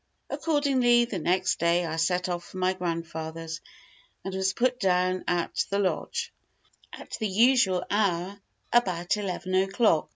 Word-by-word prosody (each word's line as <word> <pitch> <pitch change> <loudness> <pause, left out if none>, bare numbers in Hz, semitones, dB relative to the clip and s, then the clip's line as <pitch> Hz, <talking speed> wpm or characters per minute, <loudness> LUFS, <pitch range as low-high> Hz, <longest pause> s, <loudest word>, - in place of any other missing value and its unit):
Accordingly, 265 -6 +3
the 215 -6 -4
next 185 +4 +1
day 170 +1 +2
I 160 0 -3
set 180 +2 +1
off 175 -1 -3
for - - -11
my 185 0 +1
grandfather's, 165 -2 -5 0.6
and 195 - -4
was 190 0 +1
put 250 +5 0
down 185 -2 +1
at 175 -1 0
the 200 - 0
lodge, 195 -2 -2 0.6
at - - -11
the 220 - 0
usual 205 -3 +3
hour, 200 -1 0 0.3
about 185 -6 +2
eleven 185 -2 -4
o'clock. 195 -2 +2
185 Hz, 140 wpm, -27 LUFS, 175-210 Hz, 0.6 s, Accordingly